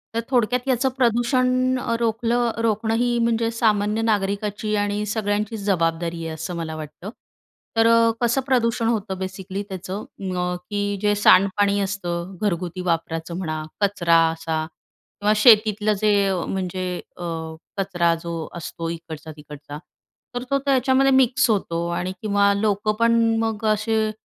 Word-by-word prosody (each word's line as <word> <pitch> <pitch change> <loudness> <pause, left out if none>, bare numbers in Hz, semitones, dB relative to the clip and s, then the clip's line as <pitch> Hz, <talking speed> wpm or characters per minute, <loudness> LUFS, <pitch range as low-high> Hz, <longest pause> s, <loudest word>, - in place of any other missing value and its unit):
तर - - +1
थोडक्यात, 250 0 +1
याचं 260 0 +2
प्रदूषण 255 +1 +2 0.2
रोखलं, 235 +1 +1
रोखणं 220 0 0
ही 240 +1 +1
म्हणजे 230 0 +1
सामान्य 215 -2 +1
नागरिकाची 210 0 -1
आणि 205 0 -1
सगळ्यांचीच 210 0 -2
जबाबदारी 165 -3 0
आहे, 160 - -4
असं 175 +3 -5
मला 160 -1 -4
वाटतं. 155 +5 -8 0.7
तर 225 0 +5 0.3
कसं 240 +3 +2
प्रदूषण 230 -3 +1
होतं, 210 -4 -1
बेसिकली 190 +1 -5
त्याचं, 190 +2 -5 0.3
अ, 180 0 -1
की 205 -1 -1
जे 210 -1 +3
सांडपाणी 200 0 +4
असतं, 185 -2 -3
घरगुती 180 -3 -2
वापराचं 165 0 -2
म्हणा, 155 -4 -3 0.2
कचरा 185 -5 +3
असा 160 -1 -3 0.6
किंवा 210 +1 +3
शेतीतलं 215 -1 +5
जे, 215 -1 +3 0.4
म्हणजे 185 -1 -3 0.3
अ, 175 - -7 0.5
कचरा 175 -4 +1
जो 165 -2 -4
असतो, 165 -1 -5
इकडचा 160 -2 -7
तिकडचा, 145 0 -10 0.6
तर 245 - -2
तो 275 - +4
त्याच्यामध्ये 270 0 +3
मिक्स 260 0 +3
होतो 170 -5 0
आणि 180 +1 -2
किंवा 200 -1 +3
लोकं 205 +1 0
पण 230 0 +4 0.2
मग 225 -1 -2
असे 215 0 0
205 Hz, 135 wpm, -22 LUFS, 175-230 Hz, 0.7 s, तर